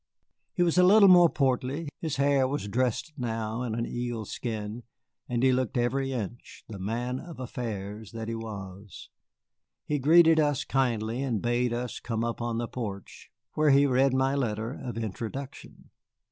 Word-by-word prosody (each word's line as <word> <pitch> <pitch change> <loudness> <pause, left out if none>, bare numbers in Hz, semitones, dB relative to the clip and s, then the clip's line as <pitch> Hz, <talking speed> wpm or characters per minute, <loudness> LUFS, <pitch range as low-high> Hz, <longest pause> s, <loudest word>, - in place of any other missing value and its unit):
He 175 - +3
was 175 +1 +2
a - - +7
little 200 +2 +7
more 175 -2 +8
portly, 135 +3 0
his 155 -3 -3
hair 140 -1 +3
was 140 -5 -3
dressed 125 +7 -1
now 115 -2 -3
in 120 -3 -2
an 115 0 -1
eelskin, 115 -2 -4 0.5
and 120 0 0
he 130 - +5
looked 130 -1 0
every 135 +3 0
inch 120 -1 -6
the 105 -3 -8
man 120 +6 -2
of 170 -4 -10
affairs 110 -5 -5
that 115 -1 -6
he 115 - -3
was. 100 -3 -8 0.8
He 150 -1 -1
greeted 160 +3 +6
us 145 -3 +1
kindly 120 -2 0
and 125 -6 -1
bade 120 +1 0
us 120 +1 -3
come 115 -1 -3
up 120 0 -3
on 120 -1 -2
the 120 0 -2
porch, 100 -6 -7 0.2
where 155 -1 +3
he 140 +1 +6
read 130 0 +3
my 135 +1 +2
letter 115 -3 -2
of 120 -4 -6
introduction. 115 +5 -7
125 Hz, 165 wpm, -28 LUFS, 115-135 Hz, 0.8 s, more